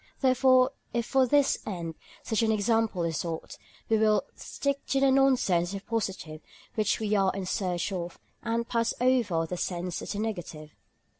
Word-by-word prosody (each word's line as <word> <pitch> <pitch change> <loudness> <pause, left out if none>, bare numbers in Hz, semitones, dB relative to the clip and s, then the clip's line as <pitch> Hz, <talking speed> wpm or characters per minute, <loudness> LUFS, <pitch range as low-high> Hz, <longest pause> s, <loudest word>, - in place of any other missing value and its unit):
Therefore 255 0 +4 0.2
if 235 -1 0
for 265 0 +3
this 285 +2 +3
end 170 -5 -5 0.3
such 220 - 0
an 225 -1 +2
example 220 -3 +1
is 165 -2 -1
sought, 165 -2 -5 0.3
we 220 -1 +2
will 215 -1 +3
stick 280 0 -3
to 275 - +1
the 270 0 +4
nonsense 255 -11 +3
as - - -6
the 200 - -3
positive 190 -8 -3 0.3
which 215 -2 +1
we 215 -1 -1
are 195 -2 +3
in 195 -1 -3
search 185 0 -1
of, 175 -2 -4 0.2
and 230 0 -1
pass 230 -1 0
over 235 -10 +2
the 180 +2 -5
sense 175 0 -3
as - - -5
the - - -5
negative. 175 -8 -5
215 Hz, 175 wpm, -28 LUFS, 180-245 Hz, 0.3 s, Therefore